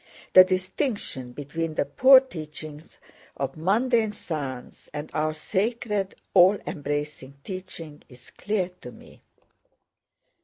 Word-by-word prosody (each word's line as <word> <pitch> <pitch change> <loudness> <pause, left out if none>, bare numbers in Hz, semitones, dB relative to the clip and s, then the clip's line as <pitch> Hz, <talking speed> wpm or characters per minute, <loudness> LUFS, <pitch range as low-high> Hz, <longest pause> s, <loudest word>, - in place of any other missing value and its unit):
The 185 - +11
distinction 185 - -2
between 155 +4 -4
the - - +1
poor 260 - +7
teachings 155 - -9 0.4
of 135 -1 -3
mundane 220 +6 +1
science 140 -10 -6
and 150 +1 -5
our 155 0 0
sacred 205 +3 -1 0.2
all 190 +2 +7
embracing 145 -1 -4
teaching 185 -5 -8
is 125 -1 -16
clear 205 -4 -2
to 125 - -9
me. - - -16
165 Hz, 110 wpm, -25 LUFS, 145-205 Hz, 0.4 s, The